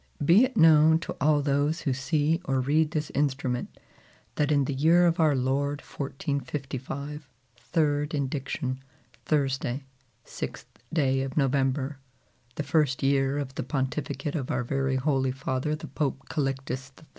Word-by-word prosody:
Be 180 - +7
it 255 -2 -6
known 160 -1 +7
to - - -5
all 145 0 +3
those 145 +3 +1
who 135 - 0
see 150 +4 +1
or 135 -1 +1
read 150 +4 +2
this 155 -1 -3
instrument, 135 -3 -1 0.6
that 150 0 +1
in 140 -2 +3
the 140 - -2
year 165 +6 +4
of 170 0 +2
our 155 -3 +4
Lord 140 +3 0
1455, 140 0 -5 0.3
third 150 +2 0
indiction, 135 -2 -2 0.5
Thursday, 135 -3 0 0.4
6th - - -6 0.3
day 135 -5 +2
of 135 +1 -4
November, 135 0 +1 0.6
the 150 - -2
first 145 -2 +1
year 135 0 +2
of 140 -2 -4
the - - -3
Pontificate 135 +2 -2
of 140 -6 -3
our - - 0
very 135 +1 0
Holy 135 -1 +1
Father 135 +3 -2
the 155 - -8
Pope 135 -3 -3
Calixtus 135 -2 -2
III. 160 - -17
140 Hz, 145 wpm, -27 LUFS, 135-150 Hz, 0.6 s, Be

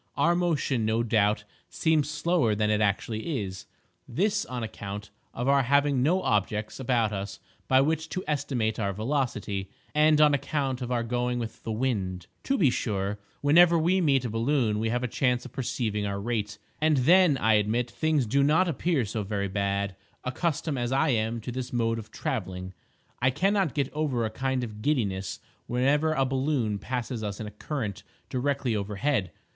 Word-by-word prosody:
Our 170 - +4
motion, 160 -8 0
no 110 +2 +1
doubt, 105 -2 +2 0.3
seems 155 -3 +1
slower 150 -7 +1
than 105 0 +1
it 105 0 +2
actually 110 - -1
is—this 105 - -4
on 125 -2 -4
account 100 -1 -6 0.2
of 120 +2 -3
our 140 0 +5
having 140 0 +2
no 175 +8 +2
objects 105 +1 -1
about 120 -4 +1
us 100 0 -5 0.3
by 130 0 +5
which 160 +2 0
to 185 +2 -3
estimate 130 -7 -1
our 100 -2 0
velocity, 110 -4 -2 0.2
and 150 0 +4
on 150 -1 +6
account 140 -2 -1
of 125 0 -4
our 120 -1 +1
going 125 +1 -1
with 115 -2 -5
the 115 - -4
wind. 100 -7 -2 0.2
To 275 - +1
be 145 -9 +4
sure, 100 -3 -2 0.2
whenever 170 +4 +6
we 175 +4 +2
meet 135 -6 +2
a - - -1
balloon 115 -2 +1
we 110 +1 0
have 120 +2 -1
a - - 0
chance 125 +1 0
of 130 - -9
perceiving 110 -5 -2
our 100 0 -3
rate, 105 -1 -2 0.2
and 155 -1 +3
then, 165 +3 +5
I 110 -3 +3
admit, 110 +3 +1
things 155 -4 +1
do 135 +6 +2
not 155 +6 +4
appear 165 -4 0
so 105 +2 -3
very 100 -1 -2
bad. 100 0 -1 0.3
Accustomed 145 +1 -1
as 120 0 -1
I 135 +4 +2
am 115 -1 0
to 125 - -5
this 125 0 -5
mode 115 -1 0
of 110 -1 -10
travelling, 95 -6 -4 0.5
I 130 - +4
cannot 185 +3 +1
get 140 -2 -1
over 145 -6 0
a 110 - -3
kind 130 +2 -1
of 105 -3 -7
giddiness 100 -9 -1 0.3
whenever 145 +6 +2
a 135 -3 +2
balloon 130 -5 0
passes 125 +1 -3
us 100 -1 -4
in 110 - -4
a 105 - -7
current 105 -1 -4 0.3
directly 130 -2 0
overhead. 105 +2 -1
125 Hz, 180 wpm, -27 LUFS, 105-145 Hz, 0.5 s, on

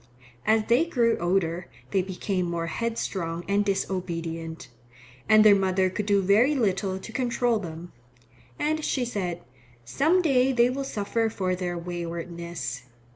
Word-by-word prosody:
As 220 0 +4
they 240 +7 +3
grew 235 -8 +2
older 175 -1 0 0.2
they 195 - +3
became 185 0 -2
more 170 -1 -2
headstrong 175 -4 -3
and 200 +1 +2
disobedient, 170 -4 -3 0.6
and 215 0 +7
their 210 - +9
mother 190 -1 +1
could 205 +2 -3
do 200 -2 +3
very 220 +10 +4
little 195 -5 0
to 190 - -9
control 240 -1 +1
them. 170 -2 -8 0.7
And 310 +1 -1
she 255 -4 0
said, 180 -7 -3 0.4
"Some 320 - +2
day 265 -4 +3
they 245 0 +4
will 275 +1 -3
suffer 225 0 -1
for 185 -4 -1
their 180 -1 -3
waywardness." 170 -6 -5
195 Hz, 140 wpm, -26 LUFS, 175-230 Hz, 0.7 s, their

